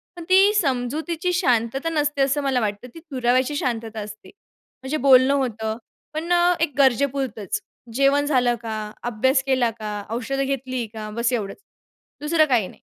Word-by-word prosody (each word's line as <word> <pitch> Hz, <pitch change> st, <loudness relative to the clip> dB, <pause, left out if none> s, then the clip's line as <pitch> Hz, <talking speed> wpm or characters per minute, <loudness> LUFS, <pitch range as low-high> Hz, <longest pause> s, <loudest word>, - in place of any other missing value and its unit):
पण 345 Hz, -, -8 dB
ती 390 Hz, +3 st, +6 dB
समजुतीची 315 Hz, -, -1 dB
शांतता 270 Hz, -, +1 dB
नसते 295 Hz, -3 st, 0 dB
असं 275 Hz, +2 st, +2 dB
मला 265 Hz, -2 st, +1 dB
वाटतं, 210 Hz, +3 st, -3 dB
ती 330 Hz, -, -9 dB
दुराव्याची 255 Hz, +2 st, +1 dB
शांतता 225 Hz, -4 st, -3 dB
असते 210 Hz, +1 st, -9 dB
म्हणजे 290 Hz, -7 st, -9 dB
बोलणं 265 Hz, 0 st, +5 dB
होतं, 225 Hz, -5 st, -2 dB, 0.4 s
पण 325 Hz, +3 st, -4 dB, 0.3 s
एक 315 Hz, -4 st, +1 dB
गरजेपुरतंच, 270 Hz, -, +1 dB, 0.3 s
"जेवण 275 Hz, +2 st, +3 dB
झालं 250 Hz, -4 st, +2 dB
का? 225 Hz, -1 st, -4 dB, 0.3 s
अभ्यास 260 Hz, +3 st, +1 dB
केला 260 Hz, -3 st, +2 dB
का? 210 Hz, -1 st, -4 dB
औषधं 265 Hz, +4 st, -2 dB
घेतली 260 Hz, -2 st, -3 dB
का?" 215 Hz, -1 st, -6 dB
बस 235 Hz, +1 st, +1 dB
एवढंच. 205 Hz, -4 st, -3 dB, 0.6 s
दुसरं 310 Hz, +1 st, +3 dB
काही 230 Hz, -7 st, +2 dB
नाही, -, -, -16 dB
260 Hz, 150 wpm, -23 LUFS, 235-290 Hz, 0.6 s, ती